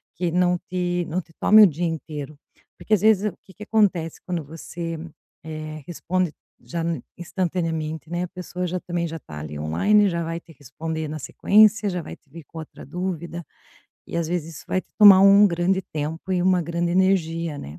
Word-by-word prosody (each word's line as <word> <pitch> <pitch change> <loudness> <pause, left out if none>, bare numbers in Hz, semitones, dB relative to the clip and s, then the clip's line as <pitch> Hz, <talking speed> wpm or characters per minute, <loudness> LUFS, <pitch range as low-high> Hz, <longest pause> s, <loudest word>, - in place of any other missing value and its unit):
que 170 0 -1
não 180 0 +2
te 175 -1 -1
não 180 +3 -1
te 165 - -24
tome 215 +1 +7
o 205 - +9
dia 170 +2 -2
inteiro. 155 -2 -5 0.4
Porque 215 - -2
às 185 - -2
vezes, 215 -1 +4
o - - -22
que 190 - -18
que 210 - -10
acontece 195 -7 +1
quando 175 -2 -2
você, 165 +2 -6 0.5
eh, 155 -1 -7
responde 175 -1 -1 0.3
já 170 -1 -4
n 165 -6 -2
instantaneamente, 165 -3 -3
né. 175 +1 -2
A - - -3
pessoa 180 0 -5
já 180 +1 -2
também 175 -1 -3
já 165 +1 -6
está 75 - -10
ali 75 0 -7
online, 200 - +3
já 170 -1 -2
vai 165 +1 -4
te 170 - -18
responder 160 +3 -5
na 155 0 -5
sequência, 210 +7 +4
já 180 -2 -3
vai - - -9
te 145 - -37
vir 160 +2 -11
com 165 - -10
outra 160 - -10
dúvida, 170 +1 -5 0.6
e - - -5
às 170 -1 0
vezes 165 -2 -3
isso - - -11
vai 185 - +1
te - - -27
tomar 200 -3 +10
um 200 +1 +7
grande 180 +2 +1
tempo 160 +5 -4
e 180 -1 +1
uma 185 -1 +3
grande 170 +1 -2
energia, 170 -4 +1
né. 75 +3 -9
170 Hz, 200 wpm, -23 LUFS, 160-185 Hz, 0.6 s, tomar